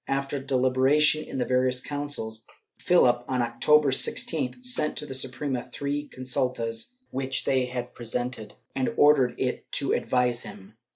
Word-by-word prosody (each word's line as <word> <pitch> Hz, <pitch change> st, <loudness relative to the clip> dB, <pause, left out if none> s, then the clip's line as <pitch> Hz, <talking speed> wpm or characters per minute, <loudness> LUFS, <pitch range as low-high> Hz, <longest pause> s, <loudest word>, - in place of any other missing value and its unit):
After 135 Hz, +1 st, -1 dB
deliberation 135 Hz, +3 st, +3 dB
in -, -, -6 dB
the 125 Hz, -, 0 dB
various 125 Hz, +1 st, +1 dB
councils, 145 Hz, -6 st, -5 dB, 0.3 s
Philip, 125 Hz, -10 st, +4 dB
on 130 Hz, -2 st, 0 dB
October 140 Hz, +5 st, +3 dB
16th, 145 Hz, -, 0 dB
sent 245 Hz, -12 st, 0 dB
to -, -, -4 dB
the 135 Hz, -, -7 dB
Suprema 130 Hz, 0 st, -1 dB
three 145 Hz, +1 st, -3 dB
con 130 Hz, -, -10 dB
sultas 125 Hz, -, -2 dB, 0.2 s
which 135 Hz, 0 st, -1 dB
they 130 Hz, -1 st, +2 dB
had 125 Hz, -1 st, -5 dB
presented 120 Hz, -2 st, -3 dB, 0.2 s
and 130 Hz, -, 0 dB
ordered 140 Hz, -4 st, +5 dB
it 125 Hz, -1 st, -3 dB
to 140 Hz, -, +1 dB
advise 125 Hz, -1 st, +1 dB
him. 105 Hz, -2 st, -10 dB
130 Hz, 150 wpm, -26 LUFS, 125-145 Hz, 0.3 s, ordered